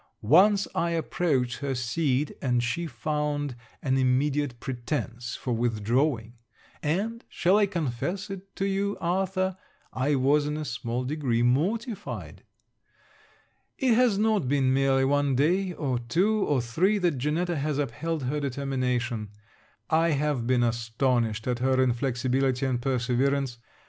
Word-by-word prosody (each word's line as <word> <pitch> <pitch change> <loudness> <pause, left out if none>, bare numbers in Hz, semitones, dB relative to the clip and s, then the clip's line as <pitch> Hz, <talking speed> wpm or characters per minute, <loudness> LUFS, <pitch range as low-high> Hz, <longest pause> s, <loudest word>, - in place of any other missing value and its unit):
Once 195 - +5
I 170 - 0
approached 140 -7 0
her 140 -2 -2
seat, 130 +3 0
and 125 -2 +1
she 165 +8 -2
found 150 -3 -2 0.3
an 130 -1 +1
immediate 130 0 +1
pretence 120 -2 -4
for 125 - -3
withdrawing; 115 +1 0 0.4
and, 205 +10 -1
shall 180 +3 +2
I 205 - +4
confess 175 - -3
it 195 0 -9
to 195 - -1
you, 200 +1 -1
Arthur, 185 +1 0 0.4
I 140 +3 +1
was 145 +3 +3
in 150 0 -2
a 155 - -4
small 120 -1 -3
degree 130 -4 0
mortified. 200 - -1 1.4
It 260 -4 +3
has 235 -3 +3
not 210 -8 +2
been 135 -1 +2
merely 135 0 +3
one 140 0 +2
day, 180 +8 +2
or 130 -7 -1
two, 190 - +1
or 135 -5 +1
three, 180 - +2
that 175 -8 0
Janetta 165 +5 0
has 145 0 -1
upheld 145 +3 -2
her 140 +4 -1
determination. 125 -5 -2 0.6
I 165 0 +3
have 145 -4 0
been 125 -1 +3
astonished 115 -1 0
at 125 -1 -1
her 130 +1 +2
inflexibility 130 +1 +1
and 125 -2 0
perseverance. 130 0 0
140 Hz, 135 wpm, -27 LUFS, 125-170 Hz, 1.4 s, Once